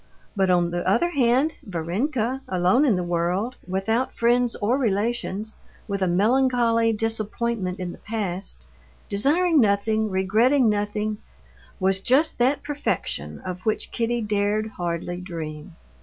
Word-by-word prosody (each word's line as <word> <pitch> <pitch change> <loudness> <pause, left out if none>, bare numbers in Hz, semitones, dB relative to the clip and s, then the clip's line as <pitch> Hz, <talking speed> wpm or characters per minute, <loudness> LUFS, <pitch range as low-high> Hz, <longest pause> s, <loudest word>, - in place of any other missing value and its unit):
But 190 -2 +2
on 175 -1 +3
the 175 0 -2
other 345 - +2
hand 270 +2 +2
Varenka, 225 - -2
alone 185 +10 +3
in 235 -8 +3
the 180 - -1
world, 175 +7 -1
without 220 +7 0
friends 240 +1 +2
or 220 +4 +1
relations, 220 -2 -1 0.3
with 200 -2 -3
a 185 - +2
melancholy 230 +3 +3
disappointment 220 -2 -2
in 180 -1 -4
the - - -12
past, 200 -4 -3 0.4
desiring 300 - +2
nothing, 215 +1 +1
regretting 220 +7 +3
nothing, 210 0 -1 0.6
was 190 0 +2
just 270 +10 +2
that 260 +4 +2
perfection 290 0 -3
of 180 -1 -6
which 215 - -1
Kitty 235 0 -1
dared 210 +1 0
hardly 175 -2 -4
dream. 160 -2 -7
215 Hz, 130 wpm, -24 LUFS, 185-240 Hz, 0.6 s, on